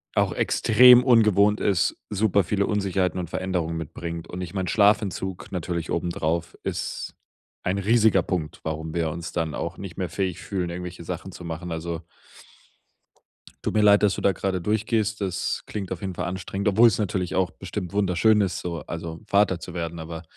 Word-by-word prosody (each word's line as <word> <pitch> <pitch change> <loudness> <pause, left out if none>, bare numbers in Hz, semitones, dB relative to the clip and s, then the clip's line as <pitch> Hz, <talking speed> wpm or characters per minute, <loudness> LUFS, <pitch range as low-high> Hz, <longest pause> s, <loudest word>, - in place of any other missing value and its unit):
auch - - +2
extrem 125 +2 +6
ungewohnt 105 -4 +4
ist, 95 -4 +1
super 100 -1 +2
viele 100 +2 0
Unsicherheiten 95 -4 0
und 85 -3 -4
Veränderungen 85 -3 -2
mitbringt. 85 +1 -6
Und 90 - -6
ich 90 +2 -6
meine, 95 -2 -2
Schlafentzug 100 -3 +1
natürlich 85 -2 -3
oben 85 +1 -1
drauf 85 +1 -2
ist - - -4 0.5
ein 95 +2 0
riesiger 105 -2 +4
Punkt, 80 -6 -3
warum 80 0 -4
wir 80 -2 0
uns 85 +1 -6
dann 80 -3 -1
auch - - -4
nicht 95 -3 -8
mehr 90 -3 -2
fähig 95 -1 -2
fühlen, 90 -3 -3
irgendwelche 90 0 -6
Sachen 90 +2 -6
zu 90 - -10
machen. 85 +1 -5
Also 80 0 -4 1.6
tut - - -1
mir 105 - +3
leid, 105 0 +6
dass 100 -2 +4
du - - -5
da 100 - +4
gerade 95 0 -2
durchgehst. 110 +2 0
Das 95 -2 -2
klingt 100 -4 -5
auf 95 - -4
jeden 95 -1 -3
Fall 90 0 -3
anstrengend, 95 +3 -3
obwohl 110 +4 +6
es 110 - +1
natürlich 95 -2 -1
auch 95 -2 +1
bestimmt 90 - -6
wunderschön 105 +2 +3
ist, 95 -3 -1
so, 85 -3 -4
also, 80 -1 -6
Vater 100 -3 +3
zu 85 - -8
werden, 85 -1 -4
aber 80 +1 -7
90 Hz, 185 wpm, -25 LUFS, 85-100 Hz, 1.6 s, extrem